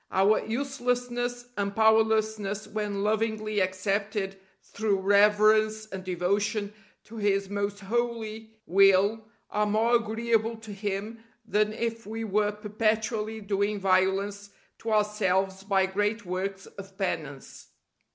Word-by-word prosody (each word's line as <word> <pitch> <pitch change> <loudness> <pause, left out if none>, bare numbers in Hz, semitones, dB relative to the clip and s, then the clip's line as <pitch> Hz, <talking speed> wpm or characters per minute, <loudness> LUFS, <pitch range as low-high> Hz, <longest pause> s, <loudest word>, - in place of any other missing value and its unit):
Our 195 +3 +3
uselessness 245 -1 -2
and 200 0 -2
powerlessness 220 -2 +2
when 205 -2 -3
lovingly 215 0 0
accepted 195 +1 -1 0.2
through 210 -2 -1
reverence 215 +2 +4
and 190 -3 -7
devotion 200 +4 -1 0.3
to 225 - -12
His 200 -2 0
most 200 0 -2
holy 225 0 -2 0.2
will 195 +3 +4 0.3
are 210 0 +1
more 220 +3 +2
agreeable 225 0 0
to 220 -2 -9
Him 205 +3 -4 0.2
than 215 -1 +1
if 230 -1 -3
we 225 +1 -4
were 210 0 +1
perpetually 215 +1 -1
doing 200 0 -1
violence 195 +2 +1 0.3
to 225 - -4
ourselves 195 -3 +1
by 195 -1 +2
great 205 +3 -1
works 190 +2 -3
of 195 -1 -12
penance. 150 -8 -4
210 Hz, 115 wpm, -27 LUFS, 195-220 Hz, 0.3 s, reverence